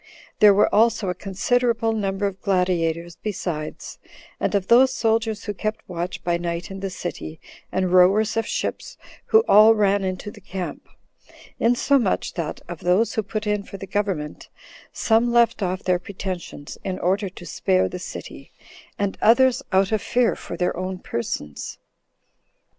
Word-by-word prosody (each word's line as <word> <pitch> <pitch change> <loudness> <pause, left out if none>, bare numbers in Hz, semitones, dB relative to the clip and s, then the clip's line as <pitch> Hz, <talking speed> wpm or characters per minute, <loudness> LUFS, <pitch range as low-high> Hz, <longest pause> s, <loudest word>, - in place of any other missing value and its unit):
There 210 -1 +8
were 205 - +3
also 225 -2 +3
a - - 0
considerable 225 +5 0
number 200 -2 -1
of 195 -1 -4
gladiators 175 -3 0
besides, 175 -7 -5 0.4
and - - 0
of 195 -2 +1
those 255 +3 +6
soldiers 225 -3 0
who 205 - -3
kept 215 +2 -4
watch 175 0 -5
by 175 -1 +1
night 170 +1 -4
in 195 - -6
the 195 0 -3
city, 175 -3 -6 0.3
and 185 -1 0
rowers 195 +4 +5
of 225 -1 0
ships, - - -4 0.3
who 445 0 +5
all 215 +2 +7
ran 200 -1 +2
into 185 +2 -4
the 210 - -15
camp; 185 -1 -6 0.7
insomuch 240 -1 +2
that, 165 -4 -4
of 175 -2 -7
those 185 +6 +2
who 220 - 0
put 215 +1 -4
in 210 -1 0
for 195 - -10
the 195 - -7
government, 190 -6 -3 0.4
some 230 +1 +2
left 235 -2 +3
off 185 0 -2
their 180 -1 +1
pretensions 180 -5 -7
in 185 -1 -3
order 195 +3 0
to 175 -1 -12
spare 95 - +1
the - - -6
city, - - -9 0.5
and 200 -1 -2
others 255 +3 +5
out 190 +1 +3
of 215 -2 +1
fear 245 -1 +1
for - - -8
their 180 +1 0
own 185 +1 -4
persons. 75 - -5
195 Hz, 160 wpm, -23 LUFS, 180-220 Hz, 0.7 s, There